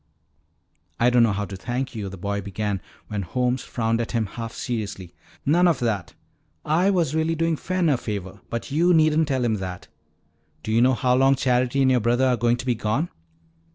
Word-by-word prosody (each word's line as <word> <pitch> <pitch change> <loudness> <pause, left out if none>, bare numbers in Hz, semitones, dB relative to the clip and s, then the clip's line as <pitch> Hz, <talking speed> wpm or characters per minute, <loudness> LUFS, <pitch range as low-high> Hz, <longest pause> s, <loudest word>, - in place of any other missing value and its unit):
"I 120 +1 +4
don't 120 -1 +5
know 115 -2 +4
how 100 +1 -2
to 100 - -8
thank 125 +7 -3
you," 105 -4 -4
the 95 - -9
boy 100 +2 -2
began 100 -1 -3 0.3
when 105 -2 -3
Holmes 125 +7 -1
frowned 115 -1 -1
at 115 - -5
him 115 -2 +1
half 115 +3 -6
seriously. 100 -8 -5 0.3
"None 175 +5 +4
of 165 -5 +3
that. 105 -7 -2 0.5
I 170 +6 +3
was 170 -7 +1
really 160 +1 +1
doing 165 0 +1
Fen 185 +2 -1
a 145 -4 +3
favor, 100 -4 -6
but 115 +4 -4
you 170 +4 +4
needn't 155 0 +3
tell 130 -4 0
him 110 -2 +1
that. 90 -2 -7 0.7
Do 110 - -3
you 115 +1 +3
know 130 +1 +4
how 125 0 +1
long 135 +2 +4
Charity 130 +1 +1
and 130 - +4
your 125 - +4
brother 120 +3 +2
are 130 -1 +3
going 120 0 +1
to 130 - -7
be 125 - +2
gone?" 120 +9 -1
120 Hz, 205 wpm, -24 LUFS, 105-135 Hz, 0.7 s, don't